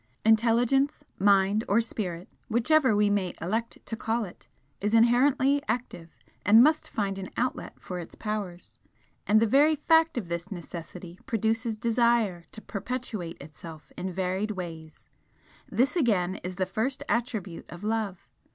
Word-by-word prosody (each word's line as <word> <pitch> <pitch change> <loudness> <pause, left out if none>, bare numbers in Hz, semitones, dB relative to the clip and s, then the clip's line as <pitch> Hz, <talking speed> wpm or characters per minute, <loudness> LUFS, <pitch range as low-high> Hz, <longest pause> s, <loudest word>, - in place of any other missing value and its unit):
Intelligence, 240 +6 +3 0.2
Mind, 200 +2 +4
or 205 - +4
Spirit, 185 -6 -3 0.2
whichever 250 +1 +3
we 210 0 +3
may 195 -3 0
elect 220 +7 -2
to 225 - -4
call 225 +1 -1
it, 180 - -14 0.3
is 210 +3 +1
inherently 260 +4 +4
active 175 -9 -4 0.3
and 220 +4 +7
must 310 +2 +2
find 195 -2 -2
an 190 - -6
outlet 255 +1 -2
for 180 -1 -6
its 170 - -9
powers, 205 -5 -5 0.5
and 215 +1 +5
the 225 - +4
very 285 +7 +4
fact 320 0 +3
of 210 -7 -3
this 170 +2 -4
necessity 175 -1 -8
produces 225 -1 0
Desire 230 -6 +1
to 220 - -10
perpetuate 215 -5 -5
Itself 155 +2 -11
in 185 +1 -4
varied 190 +3 -1
ways: 165 -5 -7 0.6
this 260 +7 +1
again 200 - +1
is 180 +1 -6
the 190 0 0
first 255 +9 -2
attribute 220 -8 -2
of 175 +3 -10
Love. 215 -4 -2
215 Hz, 145 wpm, -27 LUFS, 185-240 Hz, 0.6 s, and